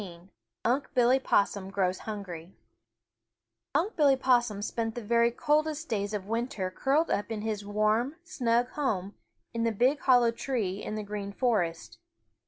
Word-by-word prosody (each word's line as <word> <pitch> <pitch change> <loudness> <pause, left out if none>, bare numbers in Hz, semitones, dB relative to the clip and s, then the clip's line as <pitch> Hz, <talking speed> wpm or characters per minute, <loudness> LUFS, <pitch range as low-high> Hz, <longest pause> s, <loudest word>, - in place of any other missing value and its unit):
XIII 175 -1 -11 0.4
UNC' 265 +5 0
BILLY 250 +1 +4
POSSUM 200 -5 +1
GROWS 190 -2 0
HUNGRY 190 -5 -7 1.2
Unc' 350 +9 +1
Billy 285 -4 +5
Possum 240 -6 +2
spent 225 +1 -2
the 240 - -5
very 235 +2 +3
coldest 305 +5 0
days 205 -1 -1
of 195 -2 -4
winter 220 -4 -2
curled 285 - +1
up 205 +2 -1
in 220 -2 -3
his 215 -1 -3
warm, 215 +6 +1
snug 245 -6 0
home 205 -10 -2 0.4
in 230 - -1
the 230 - +2
big 255 +7 +2
hollow 245 -3 +4
tree 225 -6 -2
in 215 - -4
the 215 - -3
Green 205 -1 -5
Forest. 200 -8 -1
225 Hz, 155 wpm, -29 LUFS, 200-255 Hz, 1.2 s, Billy